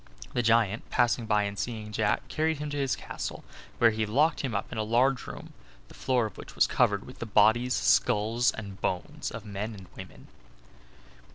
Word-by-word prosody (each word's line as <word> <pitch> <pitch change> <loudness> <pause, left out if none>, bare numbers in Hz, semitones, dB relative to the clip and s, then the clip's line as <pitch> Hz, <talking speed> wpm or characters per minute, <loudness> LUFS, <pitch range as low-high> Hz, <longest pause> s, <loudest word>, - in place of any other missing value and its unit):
The 120 - +1
giant, 115 -2 +2
passing 120 -1 +1
by 105 -1 +3
and 100 -1 -4
seeing 110 0 -4
Jack, 105 0 0
carried 160 0 0
him 150 0 -5
to 145 - -3
his 135 -2 0
castle, - - -6 0.3
where 115 -1 +5
he 110 0 -1
locked 145 +9 +2
him 130 -6 -3
up 100 - -3
in 110 - -4
a - - +1
large 125 +4 +2
room, - - -9 0.4
the - - -14
floor 125 -3 +1
of 105 - -8
which - - -10
was - - +5
covered 100 -1 +1
with 125 - -12
the 115 - -5
bodies, 110 +4 +4
skulls 115 +4 +3
and 100 -3 -8
bones 90 -1 -3
of 115 -1 -8
men 105 +2 -5
and 95 -2 -11
women. - - -11
110 Hz, 195 wpm, -28 LUFS, 105-125 Hz, 0.4 s, where